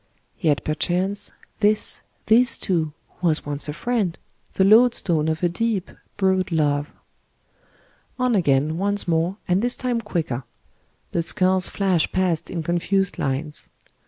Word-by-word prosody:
Yet 150 -5 +1
perchance, 180 +6 -1 0.3
tbisj 210 +1 +2 0.2
this 240 +3 +5
too, 165 -5 -1 0.3
was 165 -4 +1
once 145 0 -3
a - - -3
friend, 210 -3 -1 0.4
the 190 - +3
load 230 +5 +6
stone 160 -4 0
of 160 +1 -2
a - - +5
deep, 205 +1 -2 0.3
broad 190 -2 +1
love. 145 -2 +1 1.3
On 255 -1 +1
again, 155 -4 +2
once 205 +1 0
more, 170 +3 0
and 180 +2 +2
this 245 +1 +2
time 245 -2 -1
quicker. 160 - -3 0.7
The 170 - 0
skulls 185 +1 +2
flash 185 -5 0
past 180 -4 0
in 170 -2 -4
confused 180 +3 0
lines. 145 +3 -3
180 Hz, 135 wpm, -23 LUFS, 160-205 Hz, 1.3 s, load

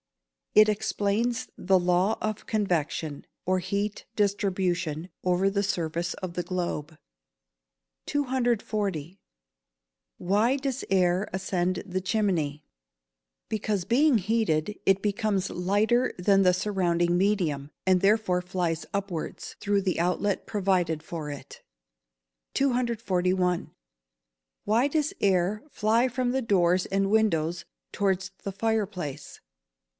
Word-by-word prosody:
_ - - +8
It 215 - +8
explains 220 +3 0
the 190 0 +3
law 180 +4 +2
of 215 -1 -3
convection, 165 -7 -1 0.2
or 185 0 +2
heat 200 +3 -3
distribution, 185 -5 0
over 180 +1 +2
the 200 0 0
surface 170 -2 -2
of 185 -2 -6
the 175 - -1
globe. 170 -4 -3 1.1
240. 215 - -1 1.0
Why 210 +8 +2
does 270 -1 -3
air 185 +1 +2
ascend 185 -1 -1
the 185 -1 -3
chimney? 180 -8 0 0.8
Because, 210 -4 -1
being 265 +5 +4
heated, 210 -3 0
it 195 0 +4
becomes 205 -2 0
lighter 210 +7 +1
than 195 +2 +4
the 180 -1 +5
surrounding 175 -3 +1
medium, 175 -8 +1 0.2
and 185 -1 +4
therefore 200 -3 +3
flies 180 -3 -2
upwards, 195 -5 -4
through 205 -1 +1
the 185 -3 0
outlet 180 +3 0
provided 185 -6 +1
for 160 -3 -5
it. 145 -2 -9 0.9
241. 190 -9 +1 1.0
_Why 235 +7 +3
does 305 -1 0
air 195 +3 +2
fly 225 +1 +2
from 250 0 -1
the 265 +1 0
doors 185 -5 +2
and 195 0 0
windows 175 -6 +1 0.3
towards 190 -1 0
the 200 - -3
fire 220 +1 0
place? 175 -9 -7
195 Hz, 115 wpm, -27 LUFS, 175-215 Hz, 1.1 s, _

